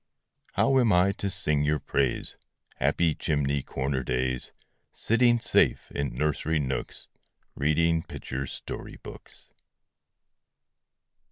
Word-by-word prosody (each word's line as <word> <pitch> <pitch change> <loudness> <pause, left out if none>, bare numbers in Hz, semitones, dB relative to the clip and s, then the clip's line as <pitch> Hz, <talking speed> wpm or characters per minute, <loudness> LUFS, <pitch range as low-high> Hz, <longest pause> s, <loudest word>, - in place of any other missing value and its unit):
How 135 -1 +3
am 120 -4 +3
I 90 +2 +4
to 100 0 -3
sing 75 -5 +1
your 75 +1 +2
praise, 70 -2 -1 0.4
Happy 80 +5 +2
chimney 70 -2 0
corner 65 0 -2
days, 65 0 -2 0.4
Sitting 120 +1 +3
safe 115 - +2
in 70 -4 -3
nursery 75 +3 0
nooks, 65 -3 -3 0.5
Reading 80 +3 +2
picture 70 -3 -5
story - - -7
books? - - -13
75 Hz, 105 wpm, -27 LUFS, 70-85 Hz, 0.5 s, I